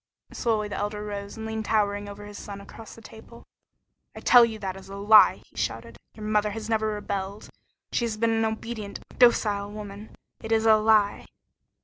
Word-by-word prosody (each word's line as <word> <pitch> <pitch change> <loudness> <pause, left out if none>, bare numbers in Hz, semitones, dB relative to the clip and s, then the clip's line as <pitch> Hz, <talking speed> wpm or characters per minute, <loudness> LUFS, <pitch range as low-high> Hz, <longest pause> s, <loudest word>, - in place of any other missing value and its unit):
Slowly 220 -3 0
the 205 - -5
Elder 210 0 -3
rose 200 0 -6
and 220 - -6
leaned 220 0 -4
towering 205 -2 0
over 205 +1 -9
his 205 0 -9
son 200 -1 -8
across 210 +2 -12
the 230 - -15
table. 225 +2 -14 0.7
"I - - -7
tell 245 -1 +7
you 225 -2 0
that 190 -3 -5
is 195 0 -12
a 195 - -8
lie!" 210 +2 +6
he - - -30
shouted. - - -4 0.2
"Your 215 - -8
mother 210 0 +1
has 215 +1 -6
never 220 -1 0
rebelled. 200 -1 -4 0.4
She 240 - 0
has 220 -2 -3
been 230 +1 +1
an 225 0 +1
obedient, 220 -1 -5 0.2
docile 210 -4 +3
woman. 205 0 -9 0.3
It 225 - -7
is 225 0 +2
a 220 -1 +7
lie!" 215 -1 +2
215 Hz, 195 wpm, -26 LUFS, 205-220 Hz, 0.7 s, tell